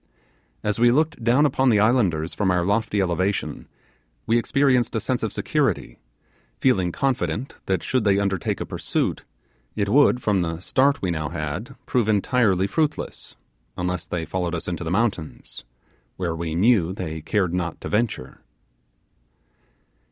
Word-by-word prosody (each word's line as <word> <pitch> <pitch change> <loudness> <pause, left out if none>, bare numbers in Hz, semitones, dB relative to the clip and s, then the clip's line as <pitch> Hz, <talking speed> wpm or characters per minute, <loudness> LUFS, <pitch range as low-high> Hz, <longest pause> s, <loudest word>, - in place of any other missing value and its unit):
As 105 +1 -1
we 120 +1 +6
looked 150 -1 +1
down 125 +6 +4
upon 135 -2 +2
the 105 -3 +4
islanders 100 -8 +2
from 100 -3 0
our 90 -1 +2
lofty 105 +1 0
elevation, 95 +2 -2 0.6
we 115 +1 +3
experienced 125 -2 +2
a - - +2
sense 125 +2 -1
of 110 - -2
security; 120 - -1 0.6
feeling 95 -10 +2
confident 125 - -1
that, 95 -1 0
should 130 -3 0
they 100 -2 +3
undertake 100 -2 -1
a - - -3
pursuit, - - -2 0.5
it 100 -2 -1
would, 135 +1 +5
from 105 -5 +1
the 80 -1 -3
start 135 +8 +1
we 90 - +1
now 80 -2 -2
had, 85 - -5
prove 120 -4 +1
entirely 105 -2 +2
fruitless, 155 +8 -2 0.4
unless 90 0 -2
they 85 -2 -3
followed 90 0 -2
us 80 - -5
into 90 -1 -3
the 80 - -3
mountains, 95 - -2 0.5
where 85 -3 -2
we 80 -1 -3
knew 95 -2 +3
they 80 -5 -5
cared 90 +2 0
not 85 -2 -2
to - - -5
venture. 105 - -2
100 Hz, 150 wpm, -23 LUFS, 85-120 Hz, 0.6 s, we